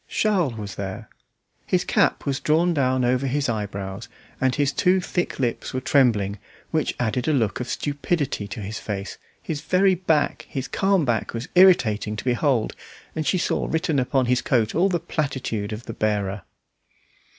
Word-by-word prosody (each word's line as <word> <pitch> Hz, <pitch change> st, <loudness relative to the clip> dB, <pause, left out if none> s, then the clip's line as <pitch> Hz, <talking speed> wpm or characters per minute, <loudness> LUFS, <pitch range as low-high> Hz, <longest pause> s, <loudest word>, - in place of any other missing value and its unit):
Charles 185 Hz, -, +1 dB
was 105 Hz, -3 st, -6 dB
there. 100 Hz, +3 st, -6 dB, 0.6 s
His -, -, +1 dB
cap -, -, +2 dB
was 140 Hz, 0 st, -1 dB
drawn 165 Hz, +3 st, +2 dB
down 130 Hz, -4 st, +1 dB
over 130 Hz, +2 st, +1 dB
his 140 Hz, +2 st, 0 dB
eyebrows, 100 Hz, -4 st, -4 dB, 0.3 s
and 130 Hz, -1 st, +2 dB
his 145 Hz, -2 st, +1 dB
two 185 Hz, +5 st, +3 dB
thick 175 Hz, -1 st, -2 dB
lips 125 Hz, -1 st, -2 dB
were -, -, +1 dB
trembling, 110 Hz, -7 st, +2 dB, 0.3 s
which 155 Hz, -2 st, 0 dB
added 120 Hz, +1 st, -1 dB
a 155 Hz, -, +3 dB
look 115 Hz, -7 st, +1 dB
of 125 Hz, -, -4 dB
stupidity 145 Hz, -6 st, -2 dB
to 100 Hz, -, -6 dB
his 105 Hz, +3 st, -5 dB
face; 100 Hz, -1 st, -5 dB, 0.2 s
his 155 Hz, -3 st, -4 dB
very 190 Hz, +1 st, +3 dB
back, 160 Hz, -5 st, 0 dB
his 135 Hz, -2 st, -4 dB
calm 195 Hz, -4 st, +2 dB
back, 115 Hz, -2 st, -1 dB
was 120 Hz, +8 st, -5 dB
irritating 120 Hz, -, +4 dB
to 105 Hz, -, -6 dB
behold, 125 Hz, -2 st, +1 dB, 0.4 s
and 155 Hz, -1 st, -2 dB
she 185 Hz, -, +2 dB
saw -, -, 0 dB
written 160 Hz, -3 st, 0 dB
upon 130 Hz, 0 st, +1 dB
his 125 Hz, +1 st, +2 dB
coat 115 Hz, -4 st, +1 dB
all 180 Hz, +5 st, +3 dB
the 175 Hz, -2 st, 0 dB
platitude 135 Hz, -10 st, -3 dB
of 110 Hz, +2 st, -6 dB
the 115 Hz, -, -6 dB
bearer. 105 Hz, -2 st, -1 dB
130 Hz, 175 wpm, -24 LUFS, 110-155 Hz, 0.6 s, irritating